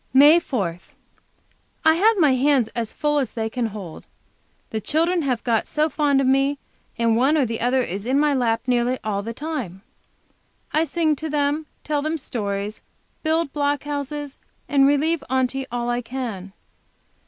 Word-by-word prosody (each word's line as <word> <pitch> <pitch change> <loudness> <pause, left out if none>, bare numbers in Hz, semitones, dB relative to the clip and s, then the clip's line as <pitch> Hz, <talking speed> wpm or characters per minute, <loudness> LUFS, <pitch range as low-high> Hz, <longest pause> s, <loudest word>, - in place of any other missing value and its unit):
MAY 295 +5 +8
4. 195 - -3 1.1
I 315 - +7
have 425 +6 +3
my 305 -6 +5
hands 260 -3 +2
as 230 -2 -4
full 295 -1 0
as 260 -6 -2
they 225 -1 -3
can 245 -1 -1
hold. 195 -7 -9 0.6
The 220 - -2
children 335 +6 +1
have 255 -5 -1
got 230 -3 +1
so 305 +1 +1
fond 290 -3 +2
of 275 - +2
me, 275 +2 +2 0.4
and 230 -1 +2
one 270 +7 +3
or 280 - +3
the 230 -1 -4
other 250 +2 +2
is 200 +2 -5
in 265 +2 +2
my 295 -1 +3
lap 230 -4 +1
nearly 250 0 +1
all 205 -2 -1
the 225 +3 -5
time. 255 - -5 0.9
I 315 +2 +3
sing 320 -2 +1
to 315 +2 -5
them, 295 +1 0 0.2
tell 295 -1 -1
them 310 +2 -1
stories, 205 -6 -4 0.4
build 320 -2 0
block 285 -1 0
houses, 290 0 -5 0.3
and 275 -1 +4
relieve 295 +2 +1
Aunty 260 +1 0
all 240 0 -2
I 240 0 -1
can. 230 -6 -6
270 Hz, 170 wpm, -22 LUFS, 230-295 Hz, 1.1 s, MAY